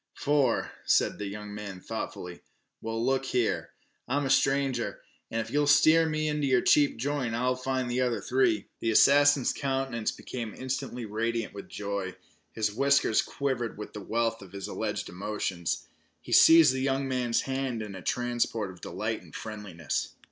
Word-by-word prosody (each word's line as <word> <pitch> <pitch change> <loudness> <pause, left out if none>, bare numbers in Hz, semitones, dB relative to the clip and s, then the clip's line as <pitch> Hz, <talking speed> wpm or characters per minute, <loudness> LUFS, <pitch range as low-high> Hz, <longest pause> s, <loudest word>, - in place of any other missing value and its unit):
"Four," 145 -3 +1
said - - +2
the 105 - -3
young 105 +1 -7
man 100 -3 -7
thoughtfully. 90 -1 -6 0.4
"Well, 115 +1 -2
look 135 0 +1
here, 125 -4 0 0.4
I'm 140 +3 0
a 135 - 0
stranger 135 -2 +2
here, - - -21 0.3
an' 115 - -1
if 115 +1 -7
ye'll 145 +1 +2
steer 160 +2 +5
me 155 0 -1
to 150 0 -2
your 130 -3 +3
cheap 145 -4 +4
joint 130 -2 -1
I'll 125 +2 +1
find 130 0 -2
the 120 +1 0
other 125 -2 0
three." 125 -5 +1
The 115 - -1
assassin's 140 +3 +5
countenance 135 -4 -1
became 115 -4 -6
instantly 130 -2 -4
radiant 115 +1 -2
with 100 - -9
joy. 100 -2 -4 0.4
His 105 -2 -1
whiskers 140 -2 +3
quivered 130 -5 -3
with 105 - -8
the 105 - -7
wealth 115 +2 -1
of 95 -1 -13
his 100 -1 -5
alleged - - -3
emotions. 95 -2 -3 0.3
He - - -11
seized 160 -5 +8
the 130 - -2
young 135 0 0
man's 125 -3 0
hand 130 -4 -2
in 105 -2 -7
a 95 - -8
transport 120 -4 -1
of 90 - -15
delight - - -3
and - - -15
friendliness. 100 -9 -4
120 Hz, 170 wpm, -28 LUFS, 105-135 Hz, 0.4 s, seized